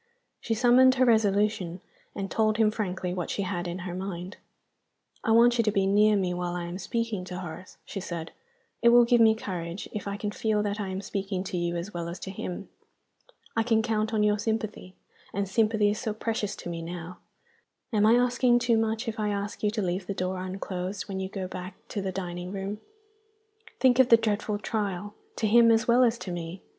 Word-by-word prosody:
She 225 - -1
summoned 255 +3 +6
her 255 0 +4
resolution, 205 -5 +2 0.4
and 195 -1 -4
told 215 -1 +2
him 220 -2 +4
frankly 185 -4 -3
what 180 -1 -3
she 200 - -1
had 180 -2 -3
in 175 +1 -4
her 180 - -4
mind. 185 0 -5 0.9
"I - - -2
want 235 +2 +5
you - - +5
to 215 - +2
be 195 -1 +2
near 210 +2 +4
me 185 -3 0
while 175 0 -3
I 175 - -3
am 175 +2 -6
speaking 230 -3 -2
to 180 0 -6
Horace," 180 0 -8
she 195 - -5
said. 170 -3 -5 0.5
"It 235 - +6
will 240 0 +7
give 240 0 +4
me 220 -1 +6
courage 180 -4 -5
if 210 - -4
I 200 0 -3
can 205 0 -3
feel 210 -1 0
that 205 0 -2
I 205 - -2
am 190 +1 -4
speaking 195 -1 -3
to 190 - -5
you 175 0 -1
as 175 +5 -5
well 170 -1 -4
as 170 - -6
to 190 - -5
him. 190 0 -6 0.9
I 225 - +3
can 225 -1 +2
count 220 -1 0
on 215 -2 +2
your 210 0 +2
sympathy 215 -4 -3 0.4
and 200 0 0
sympathy 215 0 +2
is 210 - -3
so 220 -4 -3
precious 220 -2 -2
to - - -7
me 165 -1 -4
now! 175 +1 -7 0.7
Am 210 -1 +3
I 225 - +6
asking 245 0 +4
too 240 -2 +2
much, 225 +2 -1
if 220 -1 -3
I 210 -1 0
ask 205 0 -3
you 210 - +2
to 215 0 -2
leave 180 +1 -2
the 200 - -3
door 185 0 -2
unclosed 185 +1 -4
when 195 -2 -4
you 190 0 -3
go 190 -2 -4
back 185 +1 -7
to 205 - -3
the 190 -1 -2
dining 180 -1 -5
room? 200 +1 -4 1.0
Think 250 0 +4
of 260 - +6
the 230 - +9
dreadful 215 -1 -1
trial 205 -2 -3 0.2
to 225 - -1
him 230 +2 +6
as 225 +2 +3
well 245 +2 +5
as 235 -1 +3
to 185 - -4
me! 175 +1 -6
205 Hz, 215 wpm, -27 LUFS, 185-225 Hz, 1.0 s, the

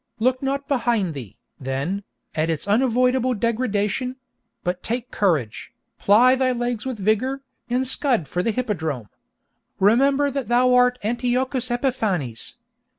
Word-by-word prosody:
Look 255 +3 +1
not 275 +1 -2
behind 230 - +1
thee, 125 -9 -9 0.2
then, 140 +10 -3 0.3
at 155 +1 0
its 165 +3 -2
unavoidable 250 +3 +2
degradation; 230 +2 -1 0.5
but 180 0 -2
take 240 +1 -3
courage, 155 - -1 0.3
ply 235 +6 +5
thy 260 -1 +2
legs 240 -1 -2
with 255 -3 -3
vigor, 220 +7 0 0.3
and 250 +2 +1
scud 250 - 0
for 175 - -1
the 205 - 0
hippodrome! 160 - -2 0.7
Remember 275 +8 +3
that 270 -4 -3
thou 250 +2 +3
art 250 0 +4
Antiochus 250 +3 0
Epiphanes. 215 - -2
240 Hz, 130 wpm, -23 LUFS, 195-255 Hz, 0.7 s, ply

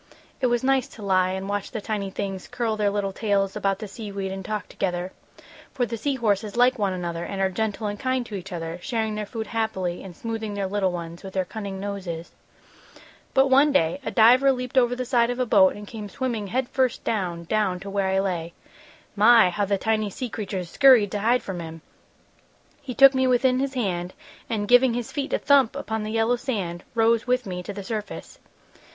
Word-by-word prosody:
It 255 - +3
was 240 0 0
nice 265 -1 +2
to 215 - -12
lie 185 -2 +2
and 190 +1 -4
watch 205 0 -2
the 225 - -4
tiny 205 -2 -3
things 195 -1 -5
curl 230 -3 -2
their 210 -1 +1
little 200 -1 -2
tails 200 -2 0
about 195 -1 0
the 215 +1 -7
sea 210 0 -8
weed 195 -1 -4
and 190 0 -5
talk 215 +2 -4
together, 180 -1 -3 0.6
for 250 - +1
the 230 0 -4
sea 275 +5 -1
horses 215 -2 -1
like 250 0 +4
one 200 -2 +1
another 170 -2 -4
and 195 - -5
are 190 0 +1
gentle 220 +2 -2
and 205 0 -3
kind 255 -1 -1
to 220 - -11
each 195 0 -6
other, 165 0 -5
sharing 220 +1 -2
their 210 -1 -4
food 220 +1 -5
happily 205 -6 -2
and 185 -3 -10
smoothing 225 -1 -4
their 200 -1 -1
little 190 -1 0
ones 170 -1 -6
with 190 -1 -10
their 190 -1 +1
cunning 200 -1 -6
noses. 190 -4 -5 1.0
"But 265 0 +4
one 280 +3 +6
day 165 - +2
a - - -2
diver 250 +4 +6
leaped 250 -1 -4
over 245 -1 +4
the 255 0 -3
side 235 -1 +2
of 245 - -2
a 255 - +1
boat 195 -5 +5
and 205 0 -9
came 215 -2 -7
swimming 235 -4 -3
head 250 +5 -1
first 260 -2 0
down, 180 -6 -2
down 190 0 0
to 200 - -7
where 195 -1 0
I 190 0 +1
lay. 175 -4 -2 0.6
My! 220 -2 +6
How 205 +3 0
the 200 0 0
tiny 215 +1 0
sea 245 +5 -5
creatures 190 -5 -5
scurried 255 -8 +6
to 205 - -2
hide 235 +4 +2
from 190 -3 -5
him. 165 -1 -8 1.0
He 260 -4 -7
took 275 0 +8
me 260 0 +2
within 255 0 +3
his 275 0 -2
hand 185 -6 -2 0.3
and, 210 -2 -1
giving 245 0 +5
his 240 -2 -4
feet 285 0 -3
a - - +2
thump 275 -3 +3
upon 220 -6 -3
the 215 0 -4
yellow 225 +2 +2
sand, 195 -10 -3
rose 230 +1 +3
with 250 0 +1
me 180 -2 -4
to 180 - -6
the 200 0 -7
surface. 210 0 -6
210 Hz, 220 wpm, -24 LUFS, 190-240 Hz, 1.0 s, took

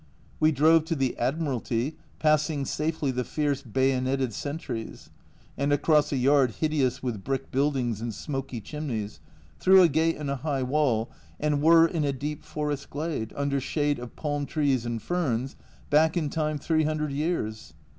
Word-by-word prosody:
We 155 0 +4
drove 155 +3 +4
to 165 - -1
the 135 -4 0
Admiralty, 130 -1 -1 0.2
passing 155 -2 +2
safely 150 -1 -1
the 125 0 -2
fierce 145 0 -1
bayoneted 130 0 0
sentries, 140 - -6 0.4
and 140 +1 0
across 150 +1 +3
a 140 - 0
yard 130 -2 +3
hideous 140 -5 0
with 115 -6 -3
brick 135 -1 -3
buildings 130 -5 0
and 115 0 -3
smoky 135 +1 -5
chimneys 110 - -5 0.4
through 190 0 +7
a - - +7
gate 160 +2 +1
in 150 - -5
a 140 0 -1
high 140 -1 -1
wall, 125 -4 +1 0.3
and 150 -1 +1
were 165 +1 +7
in 165 -2 -2
a 140 -1 0
deep 145 +3 -5
forest 150 -2 -4
glade, 145 -7 -3
under 140 -1 0
shade 145 +1 0
of 125 -1 -9
palm 145 -2 -2
trees 135 -6 0
and 115 -2 -3
ferns, 135 -7 -1 0.4
back 160 +3 +4
in 150 -4 -1
time 155 -1 -1
three 155 +2 +1
hundred 150 -1 -1
years 110 - -3
145 Hz, 165 wpm, -27 LUFS, 130-155 Hz, 0.4 s, through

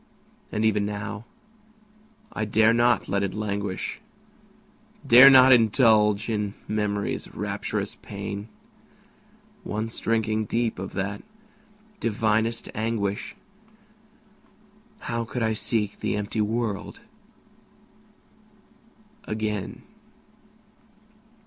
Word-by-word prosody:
And 110 +1 0
even 105 -2 +2
now, 105 +1 -5 1.1
I 110 - -2
dare 110 +1 +3
not 120 -2 +2
let 100 - 0
it 100 -1 -2
languish, 100 - -3 1.0
Dare 130 +1 +9
not 130 -1 +8
indulge 110 -3 +4
in 105 -3 -2
Memory's 105 -1 -2
rapturous - - -3
pain; 100 +1 -6 1.2
Once 110 +2 -3
drinking 110 -1 0
deep 115 -1 -1
of 95 - -6
that 100 +1 -3 0.8
divinest 110 +1 0
anguish, 110 -2 -2 1.7
How 115 - -2
could 120 +1 -4
I 110 0 +1
seek 110 -1 -2
the - - -1
empty 105 +1 -2
world 110 - -3 2.2
again? 105 -2 -4
110 Hz, 85 wpm, -25 LUFS, 105-115 Hz, 2.2 s, Dare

